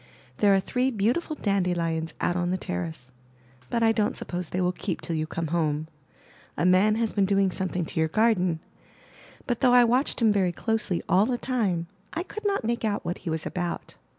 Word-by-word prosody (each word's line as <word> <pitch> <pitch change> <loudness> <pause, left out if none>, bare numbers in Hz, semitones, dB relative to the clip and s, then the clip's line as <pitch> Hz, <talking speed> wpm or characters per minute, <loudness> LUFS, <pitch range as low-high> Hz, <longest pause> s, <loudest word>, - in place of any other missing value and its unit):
There 200 -1 +5
are - - +4
three 250 +6 0
beautiful 245 +8 0
dandelions 175 - -1
out 175 - 0
on 175 -1 0
the 185 - 0
terrace, 90 - -5 0.6
but 230 - 0
I 225 - +5
don't 215 -2 0
suppose 175 -2 -4
they 180 - -2
will 180 0 +2
keep 180 -1 -4
till 165 - -4
you 155 0 -1
come 165 -1 -3
home. 155 -2 0 0.7
A - - +1
man 190 +4 +5
has 225 -1 -1
been 200 -2 +2
doing 195 -1 +2
something 180 -1 -2
to 160 - -4
your 160 0 +2
garden, 185 -5 +2 0.8
but 245 -3 -1
though 250 -2 +4
I 245 0 +8
watched 250 +4 +1
him 225 -3 +4
very 185 -3 +1
closely 215 -2 -1
all 195 +4 +4
the 250 - 0
time, 210 -11 0 0.3
I 335 - -2
could 425 +3 -5
not 395 - 0
make 235 +1 -1
out 205 -3 -1
what 175 +1 -3
he 180 - -5
was 160 0 -2
about. 175 -1 -4
190 Hz, 205 wpm, -26 LUFS, 170-225 Hz, 0.8 s, I